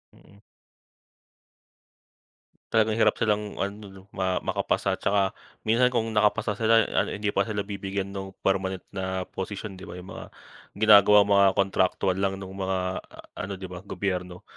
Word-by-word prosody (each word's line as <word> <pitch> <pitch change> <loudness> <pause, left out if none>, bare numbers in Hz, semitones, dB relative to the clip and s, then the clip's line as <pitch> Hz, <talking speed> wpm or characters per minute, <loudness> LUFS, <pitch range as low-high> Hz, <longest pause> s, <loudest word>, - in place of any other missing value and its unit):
Mm. 100 - -20 2.3
Talagang 110 0 +2
hirap - - +4
silang 105 -2 -1
ano 100 +1 -6
'no, 95 0 -13
ma 95 -1 -1
makapasa - - -1
tsaka 100 -1 +1 0.3
minsan 115 +3 +3
kung 115 -3 -1
nakapasa 105 +1 +2
sila 115 +2 +4
ano, - - 0
hindi 105 0 -1
pa 100 +3 0
sila 105 -2 -2
bibigyan 100 -1 -4
nung 95 -1 -7
permanent 95 -1 0
na 95 -1 -3
posisyon, 95 +1 -6
di 95 - -10
ba? - - -8
Yung 90 +1 -10
mga - - -8 0.5
ginagawang 105 -1 +6
mga 100 -1 +6
kontraktuwal 95 -1 +1
lang 95 0 0
nung 95 -1 -8
mga 95 -1 -1
a - - -17 0.2
ano 95 +1 -4
di 95 -1 -9
ba, 90 - -7
gobyerno. 90 -2 -4
100 Hz, 150 wpm, -26 LUFS, 95-105 Hz, 2.3 s, ginagawang